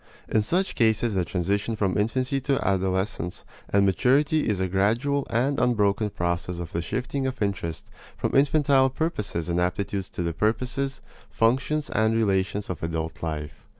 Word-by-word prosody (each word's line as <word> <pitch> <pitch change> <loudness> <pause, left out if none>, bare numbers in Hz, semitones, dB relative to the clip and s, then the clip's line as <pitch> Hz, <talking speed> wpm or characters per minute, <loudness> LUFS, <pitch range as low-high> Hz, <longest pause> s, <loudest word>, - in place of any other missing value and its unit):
In 110 - +2
such 180 - 0
cases 110 0 +2
the 95 -2 +1
transition 100 +4 -1
from 100 -4 0
infancy 130 +6 0
to 135 -4 0
adolescence 95 -2 -1 0.2
and 100 0 +3
maturity 140 - +2
is 105 -3 0
a 95 - +1
gradual 115 +10 +1
and 130 +5 +1
unbroken 105 -4 +2
process 85 -1 -2
of 85 -1 -6
the 85 - -1
shifting 130 +8 -2
of 130 - -4
interest 95 -6 -3 0.3
from - - -2
infantile 140 -1 +4
purposes 105 - -2
and 85 0 0
aptitudes 95 +1 -2
to 90 - -4
the 85 -1 -1
purposes, 130 - -1 0.3
functions, 130 +6 +1
and 110 +1 +2
relations 100 -2 +1
of 90 - -5
adult 80 +1 -3
life. 75 -2 -3
105 Hz, 155 wpm, -25 LUFS, 90-130 Hz, 0.3 s, infantile